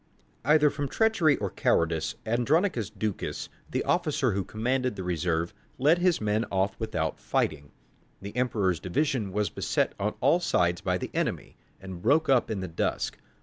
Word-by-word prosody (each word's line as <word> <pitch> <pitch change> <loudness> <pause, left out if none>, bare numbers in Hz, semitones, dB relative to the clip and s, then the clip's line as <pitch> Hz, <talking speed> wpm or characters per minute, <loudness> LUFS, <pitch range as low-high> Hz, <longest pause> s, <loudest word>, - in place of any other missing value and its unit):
Either 150 +2 +5
from 145 -1 -3
treachery 200 -7 +3
or 100 -3 -3
cowardice 80 -1 +1
Andronicus 120 - +1
Ducas, 105 -1 -4 0.2
the - - -1
officer 150 -7 +1
who 100 0 -1
commanded 125 +4 -1
the 95 - -5
reserve, 85 0 -1 0.2
led 155 +6 +4
his 180 -1 +3
men 105 +1 +1
off 95 0 0
without 80 -8 -2
fighting. 70 -2 -1 0.5
The 100 +2 -8
Emperor's 105 -9 +1
division 120 - -1
was 105 +1 -1
beset - - 0
on 105 +2 -1
all 140 +7 +4
sides 85 - +1
by - - 0
the - - -6
enemy, - - -2 0.2
and 95 -2 -8
broke 145 - +3
up 130 -3 +4
in 105 -4 -2
the 95 - -3
dusk. 80 - -2
110 Hz, 160 wpm, -28 LUFS, 95-140 Hz, 0.5 s, Either